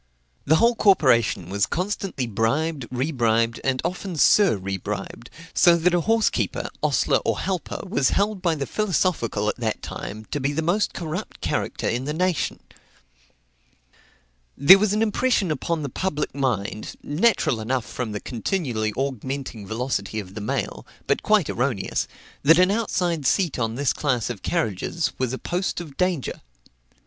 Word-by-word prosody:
The 155 - +5
whole 235 +8 +4
corporation 130 - +3
was 100 0 +1
constantly 185 -6 -2
bribed, 125 +6 -1
rebribed, 120 -4 +1
and 130 -1 0
often 180 +1 -3
sur 185 - +5
rebribed; 95 +4 -5 0.3
so 170 -1 +6
that 175 +2 +2
a 175 - +3
horse 225 +3 +2
keeper, - - -2
ostler, - - +2
or - - 0
helper, 185 -4 -3
was 140 -7 +2
held 200 -1 0
by 170 -3 +1
the 140 -2 -3
philosophical 175 - 0
at - - -1
that 115 -3 -2
time 110 +2 -6
to 145 - -1
be 140 +1 -1
the 160 +2 -1
most 185 +6 +1
corrupt 175 +4 -5
character - - -2
in 120 +3 -1
the 150 +1 -2
nation. 180 -1 0 2.0
There 180 +8 +9
was 210 -1 +2
an 215 +2 +2
impression 215 -4 +1
upon 155 +2 -2
the - - -2
public 150 +2 -2
mind, 110 -6 -2
natural 155 - +2
enough 125 +2 -1
from 120 -4 -4
the 105 - -3
continually 120 - -2
augmenting 130 -4 -4
velocity 110 -2 -2
of 95 -2 -8
the 105 - -6
mail, 105 - -3 0.2
but - - +1
quite - - +3
erroneous, - - -1 0.3
that 165 +4 +6
an 185 +1 +5
outside 180 - 0
seat 175 -6 +1
on 115 -1 -1
this 140 0 +1
class 125 -5 0
of 105 -6 -8
carriages 165 - -1
was 130 -2 0
a 130 - -3
post 180 +6 -2
of 155 -5 -9
danger. 180 -5 -1
140 Hz, 155 wpm, -24 LUFS, 115-180 Hz, 2.0 s, There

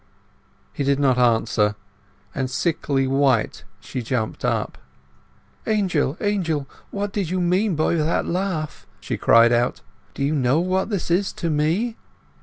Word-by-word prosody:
He 145 - -2
did 140 0 +1
not 130 -3 +3
answer; 110 -3 +2 0.6
and, 130 -2 -2
sickly 140 -2 0
white, 135 -4 +1
she 110 +4 -5
jumped 115 -2 -3
up. - - -1 0.9
"Angel, 185 -9 +1
Angel! 170 -9 -1 0.2
what 200 0 -4
do 205 - 0
you 185 0 -2
mean 180 +2 +1
by 155 +2 +1
that 160 0 +1
laugh?" 180 -4 -3
she - - -4
cried 115 +1 +5
out. 120 0 +1 0.3
"Do - - -2
you 145 +3 +1
know 135 0 +2
what 185 +3 0
this 200 -5 -2
is 190 +3 +2
to 170 -2 -2
me?" 170 +11 0
155 Hz, 145 wpm, -22 LUFS, 130-185 Hz, 0.9 s, cried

